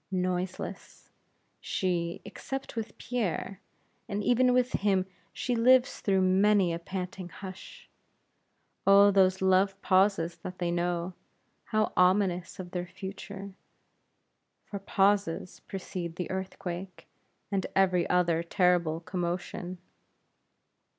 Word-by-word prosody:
Noiseless, 185 -1 -4 0.5
she, 175 -2 -2
except 270 -2 -6
with 225 -2 -5
Pierre; 200 -4 -3 0.5
and 205 0 -2
even 250 +2 +4
with 250 0 +2
him 195 -2 +1 0.3
she 245 - -2
lives 250 +2 +4
through 195 -2 +2
many 190 -1 +4
a 165 - -3
panting 185 0 -5
hush. 195 - -10 1.0
Oh, 200 +1 +8
those 190 -1 +3
love 190 +1 +3
pauses 185 -3 +3
that 180 +2 -8
they 175 -1 -1
know 175 +1 -1 0.5
how 215 -1 0
ominous 180 -1 +2
of 175 -1 -7
their 180 -1 -3
future; 195 +1 -8 1.1
for 200 - -6
pauses 195 -3 +1
precede 180 -3 -5
the 180 - -4
earthquake, 190 -1 -5 0.4
and 195 -2 0
every 185 -2 +3
other 175 -2 +2
terrible 170 -2 +2
commotion! 175 +1 -4
185 Hz, 110 wpm, -29 LUFS, 180-200 Hz, 1.1 s, Oh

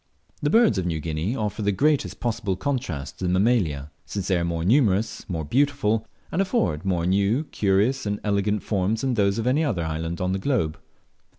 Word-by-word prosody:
The 145 - +1
birds 225 - +4
of 90 - -2
New 80 -2 -1
Guinea 80 - -2
offer 105 -3 -2
the 100 0 +2
greatest 130 - +1
possible 115 -5 -1
contrast 95 - -3
to 95 - -2
the - - +1
Mammalia, 90 - +1
since 100 -3 -4
they 90 -2 +3
are - - -1
more 85 -1 -2
numerous, 110 -3 +2
more 80 -4 -3
beautiful, 125 - +1 0.2
and 190 - +1
afford 85 - 0
more 90 -3 0
new, 100 - +2
curious, 105 +6 +1
and 105 0 -1
elegant 105 0 0
forms 105 +2 0
than 135 -2 0
those 100 -2 +2
of 115 - -2
any 135 +6 +2
other 110 - 0
island 80 +2 -3
on 90 0 0
the 95 - -1
globe. 100 - 0
100 Hz, 195 wpm, -24 LUFS, 90-120 Hz, 0.2 s, birds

